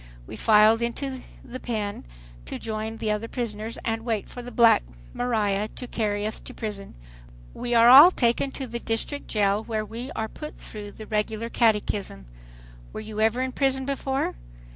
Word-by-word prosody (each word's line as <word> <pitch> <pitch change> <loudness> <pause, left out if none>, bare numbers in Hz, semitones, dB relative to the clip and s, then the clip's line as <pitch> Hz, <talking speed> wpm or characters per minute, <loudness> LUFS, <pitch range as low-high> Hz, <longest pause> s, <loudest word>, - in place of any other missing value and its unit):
We 110 - -8
filed 220 - +5
into 260 +2 -3 0.2
the 255 - -7
"pen," 215 - -4 0.4
to - - -5
join 220 0 -4
the 215 -1 -1
other 210 +2 -2
prisoners, 225 -2 -5
and 225 -1 -1
wait 225 -4 -2
for 245 - -8
the 245 - -8
"black 235 -2 +5 0.3
maria" 215 -4 0
to 250 - -5
carry 210 -3 -1
us 215 - -2
to - - -10
prison. 210 -3 -6 0.6
We 240 -1 -2
are 230 0 +7
all 275 +8 +11
taken 245 -4 +1
to 270 - -4
the 235 -1 -5
District 230 +6 -2
Jail, 205 0 +1
where 220 -2 -3
we 230 +5 -7
are 220 - -2
put 300 +7 -9
through 205 -1 -8
the 215 - -10
regular 215 +2 -2
catechism: 210 - 0 0.7
"Were - - -6
you 215 0 -5
ever 225 +4 +2
in 260 - -2
prison 265 0 0
before? 270 -1 -1
225 Hz, 175 wpm, -25 LUFS, 215-245 Hz, 0.7 s, all